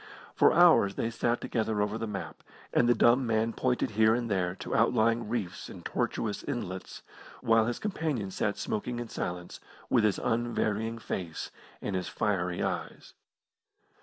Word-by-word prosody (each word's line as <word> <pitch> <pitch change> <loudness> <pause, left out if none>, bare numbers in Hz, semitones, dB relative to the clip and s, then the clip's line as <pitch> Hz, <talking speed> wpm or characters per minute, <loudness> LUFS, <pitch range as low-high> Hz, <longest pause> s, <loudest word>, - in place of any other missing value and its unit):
For - - +5
hours 165 - +6
they 115 - -1
sat 120 +1 0
together 110 -2 -1
over 105 +1 0
the 115 - -3
map, 100 -2 -6 0.3
and 120 - +4
the 120 - +5
dumb 120 +3 +4
man 115 0 +1
pointed 125 -3 0
here 110 +1 +4
and 120 -2 -2
there 90 -2 0
to - - -4
outlying 115 0 +2
reefs 110 -7 -3
and - - -11
tortuous 105 -3 -2
inlets, 95 -9 -5 0.4
while 115 -1 +4
his 120 - -1
companion 155 - -2
sat 100 +2 -1
smoking 120 +3 -3
in 120 -1 -5
silence, 90 0 -5 0.3
with 120 -4 +4
his 105 -2 +2
unvarying 115 -1 -1
face 90 -7 -5 0.3
and 100 - -2
his 90 - -2
fiery 90 -4 -1
eyes. - - -4
110 Hz, 160 wpm, -29 LUFS, 100-120 Hz, 0.4 s, hours